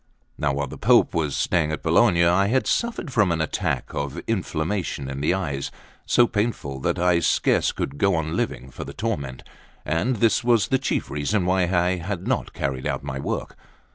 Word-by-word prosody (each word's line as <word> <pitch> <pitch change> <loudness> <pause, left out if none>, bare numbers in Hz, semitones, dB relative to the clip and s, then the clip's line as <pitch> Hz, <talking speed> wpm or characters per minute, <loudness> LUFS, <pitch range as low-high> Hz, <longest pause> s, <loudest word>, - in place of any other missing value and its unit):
Now, 75 - 0
while 70 +1 -1
the 65 - -9
Pope - - +4
was 75 -4 0
staying 80 -4 +1
at 75 - -4
Bologna, 85 +1 +4
I 90 +3 +3
had 130 +5 +1
suffered 230 - -1
from 105 -6 +3
an 80 - 0
attack 80 - -2
of 70 0 -3
inflammation 90 -7 -2
in 70 +1 -5
the 80 +5 +2
eyes, 70 -8 -3 0.4
so 120 - +5
painful 105 - -2
that - - -1
I 90 -1 +3
scarce 80 - +2
could 70 - -4
go 100 -2 +3
on 80 -1 -2
living 65 +2 -3
for - - -7
the 70 - -8
torment; 70 - -3 0.4
and 85 - 0
this 115 +3 +2
was 115 -4 +3
the 130 - +2
chief - - -2
reason 80 +7 0
why 90 0 +2
I 90 0 +2
had 90 +1 -4
not - - -1
carried 65 0 -2
out 70 -2 -2
my 65 -1 -4
work. - - -4
85 Hz, 195 wpm, -24 LUFS, 70-100 Hz, 0.4 s, so